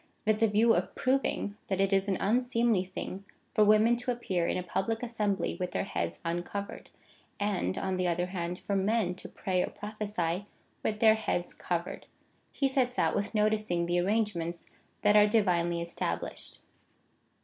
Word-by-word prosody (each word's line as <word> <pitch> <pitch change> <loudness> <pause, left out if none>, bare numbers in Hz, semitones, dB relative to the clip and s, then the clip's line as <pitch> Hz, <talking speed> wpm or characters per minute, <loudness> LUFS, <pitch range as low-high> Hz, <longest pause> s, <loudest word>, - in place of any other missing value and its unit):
With 215 0 +2
the 225 - +5
view 220 +2 +4
of - - -1
proving, 255 -5 0
that 190 -1 -1
it 195 0 +2
is 195 +1 +3
an 190 -2 +1
unseemly 235 -2 +2
thing 190 +1 -6 0.3
for 215 - +5
women 215 +3 +5
to 245 +1 -5
appear 190 -8 0
in - - 0
a 180 - -2
public 195 +6 -2
assembly 210 -6 -1
with 180 -1 -1
their - - 0
heads 85 0 -3
uncovered, 175 +4 -4 0.5
and, 200 - -1
on 190 -1 -1
the 180 0 +1
other 175 +1 +1
hand, 180 -1 -4
for 200 - -3
men 195 -1 +1
to 180 - -9
pray 185 -2 -1
or - - -1
prophesy 205 -3 -3 0.3
with 215 -1 -2
their 220 -1 +7
heads 220 -5 -2
covered, 175 0 -4 0.4
he 275 - +1
sets 255 -2 +1
out - - +2
with 205 +2 -2
noticing 210 -5 +1
the 175 +1 +1
arrangements 175 -4 -1 0.4
that 210 0 +5
are 210 0 +7
divinely 175 -6 +2
established. 85 - -4
200 Hz, 170 wpm, -30 LUFS, 175-220 Hz, 0.5 s, their